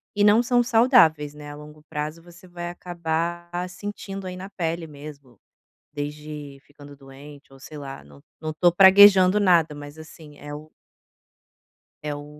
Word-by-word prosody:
e 205 - +2
não 210 +3 +5
são 245 0 +2
saudáveis, 225 - +3
né, 150 0 -10
a - - -9
longo 150 0 -14
prazo 155 +1 -5
você 175 +1 -16
vai 175 -1 -7
acabar 170 0 -4 0.2
sentindo 195 0 -8
aí 180 0 -7
na 190 +2 -8
pele 170 -3 -4
mesmo, 140 -5 -13 0.6
desde 150 -1 -7
ficando 145 0 -15
doente 140 +1 -15
ou 135 - -16
sei 150 +3 -11
lá, 135 -1 -9
não 70 -1 -18 0.2
não 155 0 -4
estou 175 +3 +3
praguejando 195 +1 +7
nada, 170 -6 +3
mas, 145 +1 -11
assim, 155 -2 -14
é 145 0 -9
o 155 +1 -12 1.3
é 150 -1 -4
o 145 0 -9
155 Hz, 160 wpm, -23 LUFS, 145-180 Hz, 1.3 s, praguejando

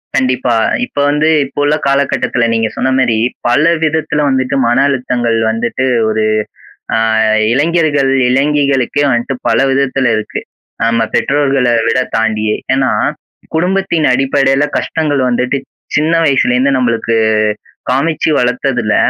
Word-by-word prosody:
கண்டிப்பா. 130 -2 0 0.3
இப்ப 245 - -24
வந்து 150 +2 +1 0.2
இப்ப 135 - -8
உள்ள 145 +1 +2
காலகட்டத்துல 140 -3 0
நீங்க 115 -1 0
சொன்ன 130 - 0
மாரி, 120 -4 +1 0.3
பல 125 +5 +2 0.2
விதத்துல 155 -1 0
வந்துட்டு 130 0 -1
மன 120 +1 +1
அழுத்தங்கள் 125 -4 -1
வந்துட்டு 120 +3 -2 0.2
ஒரு 110 0 0 0.7
அ - - +2 0.5
இளைஞர்கள் 145 -1 +1 0.2
இளைஞிகளுக்கே 140 0 +1
வந்துட்டு 120 +1 -1
பல - - +2
விதத்துல 135 -1 0
இருக்கு. 110 -1 -4 0.5
நம்ம 115 0 +1
பெற்றோர்களை 135 -3 +1 0.2
விட 115 +3 +1 0.2
தாண்டியே. 110 -1 0 0.2
ஏன்னா, 130 0 +1 0.7
குடும்பத்தின் 180 -2 0
அடிப்படையில 135 +1 +1
கஷ்டங்கள் 150 -4 -1
வந்துட்டு 125 +2 0 0.4
சின்ன 155 +2 +1
வயசுலேருந்து 135 -1 +2
நம்பளுக்கு 115 -2 0 0.7
காமிச்சு 150 +6 0
வளர்த்ததுல 125 -2 0
135 Hz, 115 wpm, -13 LUFS, 120-145 Hz, 0.7 s, உள்ள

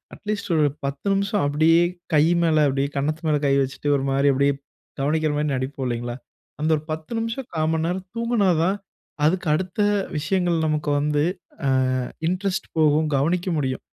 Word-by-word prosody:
At least 210 -3 -4
ஒரு 150 -1 +4 0.2
10 140 +6 -4
நிமிஷம் 200 +1 0
அப்டியே 160 +3 +4 0.3
கை 150 - +6 0.2
மேல 160 -2 +3
அப்பிடியே 140 0 0
கன்னத்து 155 +4 -1
மேல 150 -1 +3
கை 135 - +3
வச்சுட்டு 135 +2 -4
ஒரு 135 - -2
மாரி 140 +1 +3
அப்டியே 140 +1 +3 0.5
கவனிக்கிறமாரி 150 +1 0
நடிப்போம் 130 +1 -3
இல்லைங்களா. 120 0 -3 0.4
அந்த 155 - +1
ஒரு 150 - -6
10 155 +7 -6
நிமிஷம் 230 +3 -4
கா 155 - +1
மண்நேரம் 175 +4 -1
தூங்குனா 230 -4 +1
தான், 190 +4 +1 0.5
அதுக்கு 180 +1 0
அடுத்த 185 +5 -3 0.4
விஷயங்கள் 170 0 0
நமக்கு 150 -1 -1
வந்து, 150 0 +1 0.4
அ - - +2 0.6
இன்ட்ரெஸ்ட் 190 +1 -2
போகும். 155 0 +3
கவனிக்க 170 +6 0
முடியும். 130 -2 -2
155 Hz, 155 wpm, -23 LUFS, 145-185 Hz, 0.6 s, கை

